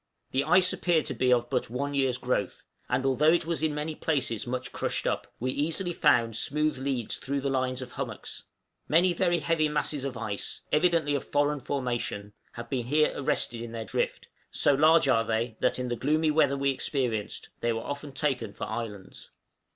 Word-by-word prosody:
The 135 +1 +1
ice 180 0 +5
appeared 170 -3 +1
to - - -3
be 130 -1 +1
of 120 -1 +3
but - - 0
one 140 +4 -2
year's 135 -3 +1
growth; 125 -7 -2 0.2
and 130 +2 0
although 135 +4 +4
it 170 -1 +2
was 165 -3 -1
in 155 -2 0
many 150 +2 -3
places 135 -8 -1
much 125 +1 -3
crushed - - -2
up, - - -2
we 130 +2 -1
easily 165 +6 -1
found 115 -7 +3
smooth 150 +4 0
leads 130 -4 -2
through 140 +1 -2
the 140 0 -1
lines 130 -1 -1
of 125 - -10
hummocks; - - -5 0.5
many 175 +3 +4
very 175 0 +2
heavy 165 -2 +1
masses 150 -1 -1
of 135 -3 -4
ice, 110 -4 -4
evidently 155 -2 +3
of 140 - -1
foreign 145 0 +1
formation, 120 -6 -3 0.2
have 120 0 -7
been 120 -2 -2
here 150 +3 +3
arrested 120 -3 0
in 115 -1 -7
their 115 -1 -4
drift: - - -2 0.2
so 145 - +3
large 155 +2 +5
are 115 -4 +4
they 115 +1 -1
that, - - +2
in 125 0 -2
the 120 - -1
gloomy 155 +5 +1
weather 145 -3 +3
we 140 0 +2
experienced, 125 -6 -2
they 120 - 0
were 115 0 -2
often 145 0 -5
taken 135 -6 -1
for - - -7
islands." 105 -5 -6
135 Hz, 195 wpm, -28 LUFS, 120-150 Hz, 0.5 s, ice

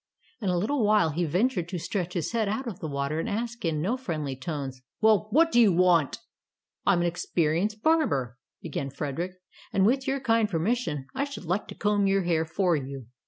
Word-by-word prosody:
In 200 - -1
a 180 - +1
little 230 +8 0
while 210 -6 +4
he 170 +4 0
ventured 180 - 0
to 185 - -3
stretch 180 +1 -3
his 170 - -1
head 225 -3 0
out 220 +6 -2
of 220 -7 -6
the 160 - -4
water 140 +2 -2
and - - -2
ask 230 +2 -3
in 160 -3 0
no 230 +8 0
friendly 155 - -3
tones, 135 -2 -5 0.2
"Well, 215 -1 +4
what 330 +8 +4
do 240 - +5
you 215 -4 +6
want? 175 -4 +3 0.3
" - - -57
"I 200 - +6
am 175 - +2
an - - +1
experienced 175 +5 0
barber," 140 - +1 0.2
began 140 -4 -3
Frederick, 150 +6 -4 0.4
"and 190 0 +3
with 265 +5 +2
your 270 +1 0
kind 230 -4 +2
permission 170 - -1
I 270 - 0
should 280 -9 -8
like 180 +5 -1
to - - -9
comb 205 -1 +1
your 195 0 +2
hair 165 -2 +1
for 175 +2 +1
you. 135 -3 -5
180 Hz, 210 wpm, -27 LUFS, 160-220 Hz, 0.4 s, you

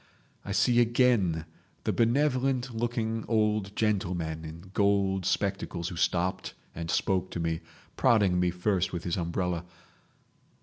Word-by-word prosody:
I 100 - -6
see 120 +4 +3
again 115 -9 +3 0.4
the - - 0
benevolent 130 +1 +1
looking 115 -1 -1
old 105 -2 +1
gentleman 90 -7 -1
in 85 +4 -10
gold 100 -2 +2
spectacles 95 -3 -1
who 90 - -7
stopped 90 +2 0 0.2
and 85 0 -5
spoke 95 -1 +1
to - - -5
me—prodding 90 +4 0
me 90 0 +2
first 90 +1 0
with 85 -1 -3
his 85 - -1
umbrella. 90 0 -2
100 Hz, 125 wpm, -28 LUFS, 85-115 Hz, 0.4 s, see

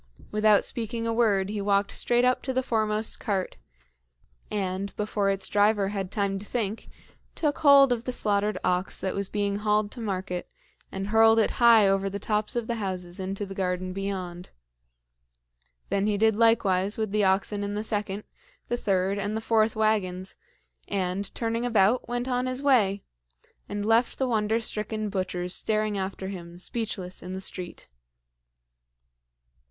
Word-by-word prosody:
Without 215 -1 +4
speaking 230 0 -3
a 230 - 0
word 205 -5 +2
he 210 -1 -3
walked 200 0 +1
straight 240 0 +2
up 250 0 +2
to 260 - -3
the 260 0 0
foremost 215 -2 0
cart, 195 -3 -2 0.9
and, 195 -1 -3
before 210 -1 0
its 195 -1 0
driver 205 -1 +2
had 195 -2 -3
time 200 -1 -1
to 205 - -9
think, 220 -2 -3 0.5
took 295 -3 -1
hold 280 -3 +7
of 235 0 -5
the 255 - -1
slaughtered 210 -2 0
ox 180 +1 0
that 190 - -2
was 200 -1 -3
being 200 -1 -1
hauled 210 0 +1
to 245 - -7
market, 185 -4 -3 0.4
and 195 +1 -4
hurled 225 +1 +5
it 220 - +3
high 230 -3 +7
over 195 0 +1
the 200 - -4
tops 210 +3 -1
of 240 -2 -1
the 235 0 -2
houses 185 -1 -4
into 195 +2 -3
the 195 - -8
garden 185 -1 -2
beyond. 185 -2 -5 1.4
Then 200 +1 +1
he 210 -1 +1
did 220 0 +3
likewise 205 -4 +3
with 220 -2 -2
the 210 0 +2
oxen 200 +2 +1
in 205 0 -3
the 210 - -2
second, 210 -2 -3 0.5
the 240 - 0
third, 195 -1 0
and 205 +2 -2
the - - -1
fourth 220 -1 +2
wagons, 195 -4 0 0.5
and, 190 0 -2
turning 230 0 -1
about, 230 0 +2
went 245 +1 -2
on 250 0 0
his 255 +2 -3
way, 205 -8 +3 0.7
and 205 0 -3
left 225 +2 +2
the 265 - 0
wonder 220 -1 +1
stricken 215 -1 -3
butchers 185 -2 -3
staring 215 -1 0
after 190 0 -4
him, 175 -3 -8
speechless, 190 -2 -3
in 180 +1 -7
the 190 - -4
street. 180 -2 -6
205 Hz, 165 wpm, -27 LUFS, 195-225 Hz, 1.4 s, hold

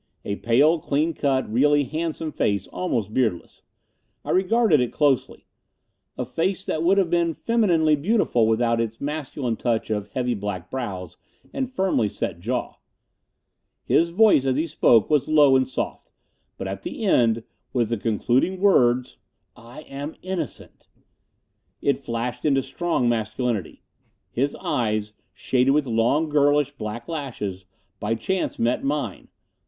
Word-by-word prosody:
A 100 - -2
pale, 145 +8 +3
clean 155 +3 0
cut, 135 -3 0
really 145 +4 +4
handsome 155 +2 -3
face, 100 -7 0
almost 115 - -3
beardless. 110 -10 -1 0.6
I - - -2
regarded 195 - +3
it 125 - -1
closely. 145 -4 0 0.7
A 125 - -2
face 180 +10 -2
that 155 - -2
would 185 +4 +3
have 190 -4 +2
been 170 -2 +1
femininely 175 -10 +2
beautiful 150 - +2
without 115 +1 +2
its 115 0 -4
masculine 140 -5 -3
touch 115 -2 -1
of 105 -1 -2
heavy 125 -1 0
black 100 -4 -5
brows 95 -10 -5 0.4
and 265 -2 -2
firmly 190 - +1
set 85 - -4
jaw. 120 +7 -3 1.1
His 170 +1 +2
voice 180 -7 +4
as 130 - +2
he 155 +4 0
spoke 120 -8 +3
was 150 -4 +2
low 150 -3 +5
and 130 0 +3
soft; 130 - -5 0.5
but - - -5
at 95 +1 -5
the - - -6
end, 115 - +3 0.3
with 120 -4 0
the 115 - -1
concluding 120 - 0
words, 125 -11 +3 0.4
"I 120 +6 -12
am 145 +1 -7
innocent!" 185 -1 -6 0.9
it 140 -2 +1
flashed 120 -2 -4
into 135 -3 +2
strong 135 -1 -1
masculinity. 110 -3 -2 0.5
His 140 +4 -1
eyes, 105 -3 -1 0.2
shaded 130 +1 +1
with 150 -1 +2
long, 120 +7 +1
girlish 145 -1 +3
black 115 -3 -6
lashes, 115 - -5 0.3
by 105 +2 -1
chance 185 +12 -2
met 120 +2 0
mine. 140 -8 -3
130 Hz, 140 wpm, -24 LUFS, 115-155 Hz, 1.1 s, low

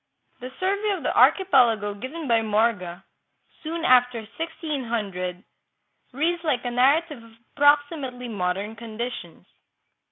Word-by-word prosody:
The 255 +1 -8
survey 400 +3 0
of - - -10
the - - -1
archipelago 240 - +4
given 275 +9 -7
by 230 -2 +3
Morga 210 -5 0 0.6
soon 325 +1 -4
after 250 -2 +4
1600 230 - -4 0.7
reads 335 +6 -1
like 260 -6 -1
a 245 - -2
narrative 280 +3 +2
of 230 -1 -17 0.2
approximately 285 -3 +2
modern 200 0 -3
conditions. 230 -6 -7
245 Hz, 115 wpm, -24 LUFS, 220-300 Hz, 0.7 s, archipelago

